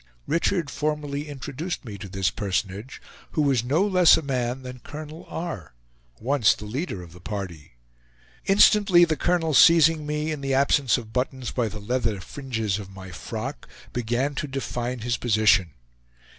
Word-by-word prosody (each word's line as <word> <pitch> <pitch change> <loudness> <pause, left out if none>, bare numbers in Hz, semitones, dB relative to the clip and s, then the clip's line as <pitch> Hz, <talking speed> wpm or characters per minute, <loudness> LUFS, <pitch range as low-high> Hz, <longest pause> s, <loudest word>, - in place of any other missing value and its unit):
Richard 165 -1 0
formally 150 0 -3
introduced 145 +4 -5
me 105 -4 -7
to 95 - -8
this 95 -1 0
personage, 100 +4 -3 0.3
who 155 - +2
was 135 -5 +2
no 150 +10 +2
less 185 -4 +6
a 160 - -3
man 130 -1 -2
than 125 0 -8
Colonel 155 +5 -9
R., 130 - -6 0.4
once 125 -2 +3
the 105 - -9
leader 110 - -4
of 85 -1 -13
the 90 - -13
party. 90 - -6 0.7
Instantly 195 -3 +6
the 160 -2 0
colonel 165 -1 +1
seizing 160 -1 +6
me, 150 +1 -1
in 150 -2 -4
the 135 -1 0
absence 140 -1 +3
of 110 -2 -9
buttons 130 -1 -2
by 120 -3 0
the 105 0 -7
leather 115 -1 -1
fringes 110 -3 -3
of 100 -2 -8
my 95 -1 -10
frock, 115 +9 -6 0.2
began 120 +4 -1
to 150 +2 -3
define 125 -3 -4
his 120 +1 -1
position. 105 -5 +3
130 Hz, 160 wpm, -25 LUFS, 110-150 Hz, 0.7 s, less